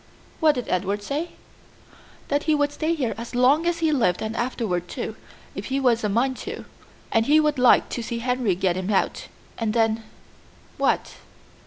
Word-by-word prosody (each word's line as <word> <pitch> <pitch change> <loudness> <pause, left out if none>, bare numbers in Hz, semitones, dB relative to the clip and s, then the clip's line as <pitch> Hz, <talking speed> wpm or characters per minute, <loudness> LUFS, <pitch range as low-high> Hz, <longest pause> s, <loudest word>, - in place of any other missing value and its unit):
"What 310 -2 +4
did 250 - -4
Edward 195 +3 -1
say?" 295 +9 -3 1.0
"That 285 +1 0
he 310 - +3
would 290 0 +1
stay 320 +3 -1
here 260 -7 -1
as 235 +1 -7
long 275 +7 +4
as 340 -1 0
he 315 - +3
lived 220 - +1
and 220 +1 -3
afterward, 225 -8 -2
too, - - -5 0.4
if - - -6
he 270 +1 -1
was 240 -4 +2
a 210 - +1
mind 250 +5 +1
to, - - -7 0.5
and 225 0 +2
he 300 +2 +6
would 300 -3 +1
like 250 -1 +5
to 240 - -3
see 235 +1 -4
Henry 245 -4 0
get 180 -1 0
him 185 +1 -3
out; 200 - 0 0.3
and 225 -1 -1
then 225 -1 +2 0.4
" - - -28
"What?" - - 0
245 Hz, 190 wpm, -24 LUFS, 215-290 Hz, 1.0 s, he